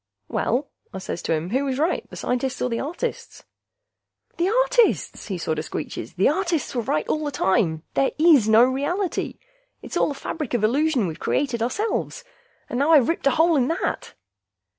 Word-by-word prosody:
"Well," 275 Hz, +3 st, 0 dB, 0.2 s
I -, -, -6 dB
says 185 Hz, -2 st, -5 dB
to -, -, -3 dB
him, 165 Hz, +4 st, -4 dB
"who 265 Hz, +4 st, +1 dB
was 265 Hz, -2 st, -2 dB
right, 320 Hz, +5 st, 0 dB
the -, -, -10 dB
scientists 255 Hz, +1 st, -2 dB
or 250 Hz, -, -1 dB
the 230 Hz, -, -1 dB
artists?" 350 Hz, -, -5 dB, 0.9 s
"The 350 Hz, +2 st, +1 dB
artists!" -, -, +2 dB
he 195 Hz, -4 st, -3 dB
sorta 160 Hz, -2 st, -2 dB
screeches. -, -, -6 dB
"The -, -, +3 dB
artists 340 Hz, -1 st, 0 dB
were 245 Hz, -, 0 dB
right 155 Hz, -8 st, -1 dB
all 310 Hz, -, -1 dB
the 295 Hz, -, -1 dB
time... 175 Hz, -, +1 dB
there 275 Hz, -, +2 dB
is 300 Hz, -9 st, +5 dB
no 220 Hz, +2 st, +7 dB
reality! 290 Hz, +9 st, -1 dB, 0.5 s
It's -, -, -4 dB
all -, -, +2 dB
a 285 Hz, -, -4 dB
fabric 290 Hz, -2 st, -4 dB
of 225 Hz, -, -1 dB
illusion 270 Hz, +1 st, +2 dB
we've 160 Hz, -3 st, -5 dB
created 250 Hz, -5 st, -1 dB
ourselves! 420 Hz, -, -2 dB, 0.4 s
And 245 Hz, -, -3 dB
now 290 Hz, +4 st, +3 dB
I've 280 Hz, -7 st, +5 dB
ripped 330 Hz, -4 st, 0 dB
a 275 Hz, -, +2 dB
hole 330 Hz, +1 st, +4 dB
in 255 Hz, -3 st, +2 dB
that!" 330 Hz, +4 st, -3 dB
275 Hz, 185 wpm, -23 LUFS, 235-330 Hz, 0.9 s, no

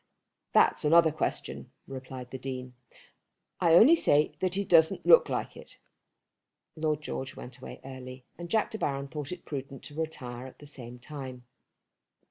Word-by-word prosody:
"That's -, -, +4 dB
another 160 Hz, +1 st, +6 dB
question," 155 Hz, -1 st, -3 dB, 0.2 s
replied 130 Hz, -2 st, -8 dB
the 130 Hz, -, -6 dB
Dean. 130 Hz, -1 st, -6 dB, 0.9 s
"I 165 Hz, -2 st, +5 dB
only 255 Hz, -, +8 dB
say 150 Hz, -, +3 dB
that 185 Hz, -1 st, 0 dB
he 200 Hz, +1 st, 0 dB
doesn't 160 Hz, -3 st, +4 dB
look -, -, +7 dB
like -, -, -3 dB
it." -, -, -13 dB, 1.0 s
Lord 155 Hz, -2 st, -1 dB
George 135 Hz, -2 st, -5 dB
went 125 Hz, 0 st, -10 dB
away -, -, -9 dB
early, 130 Hz, -1 st, -9 dB
and 170 Hz, +1 st, -8 dB
Jack 220 Hz, +3 st, +1 dB
De 220 Hz, -, -5 dB
Baron 140 Hz, -3 st, -2 dB
thought 150 Hz, 0 st, -6 dB
it 180 Hz, -1 st, -7 dB
prudent 135 Hz, -2 st, -6 dB
to -, -, -10 dB
retire 130 Hz, -6 st, -5 dB
at 130 Hz, -, -14 dB
the 145 Hz, -, -13 dB
same 125 Hz, -4 st, -9 dB
time. 130 Hz, -1 st, -8 dB
145 Hz, 160 wpm, -29 LUFS, 130-160 Hz, 1.0 s, only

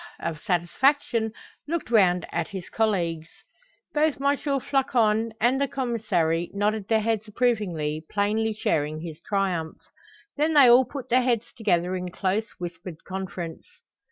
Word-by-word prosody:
of 165 Hz, -2 st, -4 dB
satisfaction, 225 Hz, -, +1 dB, 0.4 s
looked 325 Hz, -6 st, -3 dB
round 180 Hz, -5 st, +4 dB
at -, -, -1 dB
his 190 Hz, -3 st, -7 dB
colleagues. 170 Hz, -8 st, 0 dB, 0.7 s
Both 305 Hz, 0 st, +2 dB
M. 280 Hz, +1 st, +2 dB
Floçon 255 Hz, -6 st, +1 dB
and 255 Hz, +4 st, +2 dB
the 280 Hz, -, +2 dB
Commissary 215 Hz, -11 st, 0 dB
nodded 205 Hz, 0 st, 0 dB
their 220 Hz, -1 st, +3 dB
heads 220 Hz, 0 st, -1 dB
approvingly, 190 Hz, -10 st, -1 dB
plainly 215 Hz, +2 st, +1 dB
sharing 155 Hz, -6 st, -1 dB
his 165 Hz, -1 st, -8 dB
triumph. 185 Hz, -6 st, -1 dB, 0.6 s
Then 310 Hz, +2 st, +1 dB
they 280 Hz, -3 st, +8 dB
all 245 Hz, +2 st, +7 dB
put 275 Hz, -1 st, -8 dB
their 255 Hz, +2 st, +4 dB
heads 240 Hz, -3 st, 0 dB
together 185 Hz, -5 st, +1 dB
in 180 Hz, 0 st, -4 dB
close, 195 Hz, +5 st, -1 dB
whispered 175 Hz, -1 st, -7 dB
conference. 185 Hz, -, -6 dB
210 Hz, 135 wpm, -25 LUFS, 175-240 Hz, 0.7 s, they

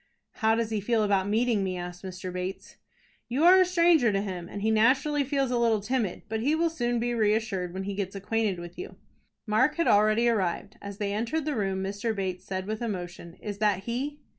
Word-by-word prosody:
"How 220 Hz, -1 st, +2 dB
does 225 Hz, -1 st, -1 dB
he 215 Hz, -2 st, -1 dB
feel 225 Hz, +1 st, +1 dB
about 200 Hz, -1 st, +1 dB
meeting 220 Hz, -1 st, +2 dB
me?" 185 Hz, -1 st, -2 dB
asked 180 Hz, +1 st, -7 dB
Mr. 185 Hz, -1 st, -6 dB
Bates. 185 Hz, +1 st, -6 dB, 0.5 s
"You 265 Hz, +6 st, 0 dB
are 370 Hz, +2 st, +8 dB
a -, -, +5 dB
stranger 335 Hz, -9 st, +4 dB
to 195 Hz, -, +1 dB
him, 180 Hz, -3 st, -5 dB
and 200 Hz, -, -6 dB
he 220 Hz, -, +2 dB
naturally 265 Hz, +7 st, +3 dB
feels 275 Hz, -1 st, 0 dB
a 245 Hz, -, +1 dB
little 230 Hz, -2 st, +3 dB
timid, 215 Hz, -2 st, -2 dB
but 220 Hz, 0 st, -2 dB
he 285 Hz, +7 st, +2 dB
will 330 Hz, 0 st, +1 dB
soon 240 Hz, -6 st, -1 dB
be 240 Hz, +1 st, -1 dB
reassured 215 Hz, -5 st, 0 dB
when 190 Hz, +2 st, -5 dB
he 200 Hz, +1 st, -4 dB
gets 195 Hz, -1 st, -4 dB
acquainted 205 Hz, 0 st, -1 dB
with 175 Hz, 0 st, -9 dB
you." 380 Hz, -, -7 dB, 0.5 s
Mark 225 Hz, +6 st, +2 dB
had 335 Hz, -, +1 dB
already 215 Hz, +3 st, +4 dB
arrived. 205 Hz, -1 st, -1 dB
As 200 Hz, -1 st, -7 dB
they 200 Hz, -1 st, -2 dB
entered 235 Hz, +9 st, -1 dB
the 300 Hz, -2 st, -1 dB
room, 195 Hz, -3 st, -1 dB
Mr. 200 Hz, +3 st, -2 dB
Bates 190 Hz, -2 st, -3 dB
said 190 Hz, -2 st, -4 dB
with 215 Hz, +2 st, -4 dB
emotion, 175 Hz, -6 st, -5 dB
"Is 205 Hz, -1 st, -6 dB
that 205 Hz, -3 st, +1 dB
he?" 270 Hz, +7 st, -3 dB
215 Hz, 215 wpm, -27 LUFS, 195-240 Hz, 0.5 s, are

